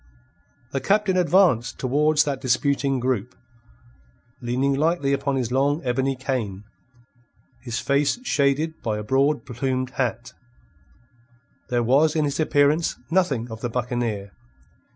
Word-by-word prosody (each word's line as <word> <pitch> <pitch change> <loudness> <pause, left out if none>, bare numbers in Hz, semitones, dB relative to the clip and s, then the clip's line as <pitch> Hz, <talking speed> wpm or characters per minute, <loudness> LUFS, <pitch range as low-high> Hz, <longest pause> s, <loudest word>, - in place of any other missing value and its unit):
The 135 - -2
Captain 205 -1 +2
advanced 170 - +3
towards 150 +3 +2
that 140 -3 -3
disputing 135 +1 +1
group, 125 -1 -2 1.1
leaning 125 +3 0
lightly 145 -1 +1
upon 140 0 -1
his 125 -3 -2
long 140 +3 +1
ebony 130 +2 0
cane, 120 -7 -3 1.0
his 120 -2 -5
face 140 - +1
shaded 150 - 0
by 110 -2 -2
a 105 - -5
broad 140 +6 +1
plumed 130 0 -2
hat. 120 -2 -3 1.4
There 120 -1 +1
was 145 +6 +3
in 155 -1 +2
his 140 +1 -2
appearance 150 +1 +2
nothing 140 -11 0
of 110 0 -8
the 120 - -2
buccaneer. 115 -4 -3
135 Hz, 125 wpm, -23 LUFS, 120-145 Hz, 1.4 s, advanced